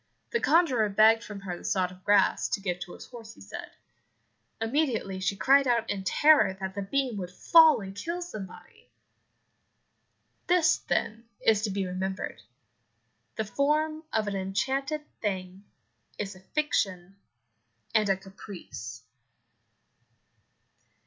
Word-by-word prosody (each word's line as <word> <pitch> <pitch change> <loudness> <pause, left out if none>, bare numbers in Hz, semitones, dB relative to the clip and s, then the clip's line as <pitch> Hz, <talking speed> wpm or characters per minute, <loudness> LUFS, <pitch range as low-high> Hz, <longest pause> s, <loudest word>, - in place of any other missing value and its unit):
The 465 - +1
conjurer 270 - +3
begged 220 +3 +5
from 210 -4 -8
her 185 -2 -5
the - - -12
sod 185 -2 0
of 185 0 -16
grass, 205 -2 +3
to - - -1
give 180 -3 -3
to 175 0 -7
his - - -10
horse, 230 -3 -11
he - - -18
said. 100 - -8 0.9
Immediately 225 -5 -1
she 195 +1 -1
cried 275 +6 +4
out 235 -2 +2
in 195 -1 -3
terror 290 - +4
that 190 0 -4
the 200 - -4
beam 250 +2 -1
would 180 -2 -4
fall 315 - +6
and 195 0 -8
kill 335 - -4
somebody. 210 - -10 1.6
This, 340 -3 +4
then, 230 0 -2 0.2
is 215 -2 +4
to - - -2
be 195 0 -2
remembered 185 +1 -4 0.9
the 220 - -2
form 305 +6 0
of 215 -1 0
an 200 - -2
enchanted 265 +11 -2 0.2
thing 190 -1 -4 0.5
is 205 -1 -4
a - - -14
fiction 190 - -2 0.8
and 215 -2 +3
a 195 - +3
caprice. 180 - -10
205 Hz, 135 wpm, -28 LUFS, 190-265 Hz, 1.6 s, fall